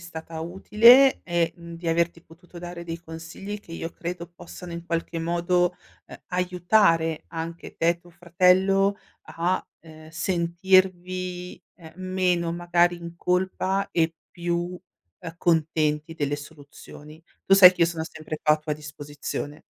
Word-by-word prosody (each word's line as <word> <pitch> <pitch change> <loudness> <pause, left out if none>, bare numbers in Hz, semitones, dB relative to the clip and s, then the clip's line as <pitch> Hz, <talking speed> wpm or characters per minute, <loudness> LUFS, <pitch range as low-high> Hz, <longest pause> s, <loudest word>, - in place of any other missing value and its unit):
stata 165 -1 -8
utile 225 +10 +6
e, 170 -2 0
mhmm, 170 0 -10
di 165 0 -5
averti 170 0 0
potuto 175 +2 -15
dare 175 0 -7
dei 165 0 -5
consigli 165 +5 -8
che 165 - -14
io 165 0 -5
credo 170 0 -6
possano 175 0 -10
in 170 0 -7
qualche 165 0 -2
modo, 175 +1 +1 0.3
ehm, - - -11
aiutare 180 -2 +2
anche 165 +1 -7
te 165 - +1
e 170 0 +2
tuo 175 0 -19
fratello 185 +3 +3 0.3
a, 175 +3 -2 0.2
ehm, 155 -1 -14
sentirvi, 180 +1 0
ehm, 160 -3 -14
meno 185 -2 0
magari 175 0 +2
in 170 0 -9
colpa 185 +2 0
e 165 -1 +1 0.2
più, 175 +1 -3 0.4
ehm, 165 - -8
contenti 160 -2 0
delle 145 -2 -1
soluzioni. 150 +1 -13 0.2
Tu 195 - +5
sai 185 -2 +10
che 175 - 0
io - - +5
sono 165 -1 -3
sempre 155 -1 -7
qua 150 -1 +5
a - - -6
tua 155 0 -4
disposizione. 150 0 -6
170 Hz, 145 wpm, -25 LUFS, 165-180 Hz, 0.4 s, sai